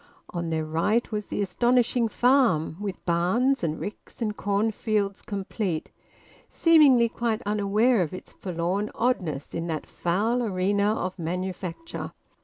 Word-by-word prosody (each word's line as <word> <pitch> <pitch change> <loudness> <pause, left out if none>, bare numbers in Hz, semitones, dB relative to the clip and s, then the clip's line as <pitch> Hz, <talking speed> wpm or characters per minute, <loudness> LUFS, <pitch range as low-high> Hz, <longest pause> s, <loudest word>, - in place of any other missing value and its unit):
On 170 -1 -3
their 160 -1 -1
right 200 +11 0
was 210 -1 -3
the 205 - -1
astonishing 240 +4 +2
farm, 240 - +3
with 200 -2 -5
barns 190 +10 +2
and 160 -1 -1
ricks 205 - -8
and 215 -3 -1
cornfields 205 0 0
complete, 195 -5 -3 0.6
seemingly 290 -8 +5
quite 230 0 -2
unaware 210 +3 +2
of 165 - -1
its 185 - -9
forlorn 185 +3 -2
oddness 180 - -1
in 165 +1 -3
that 160 -2 -3
foul 215 +8 0
arena 200 -1 +1
of 185 -3 -4
manufacture. 180 - -4
205 Hz, 130 wpm, -26 LUFS, 175-235 Hz, 0.6 s, seemingly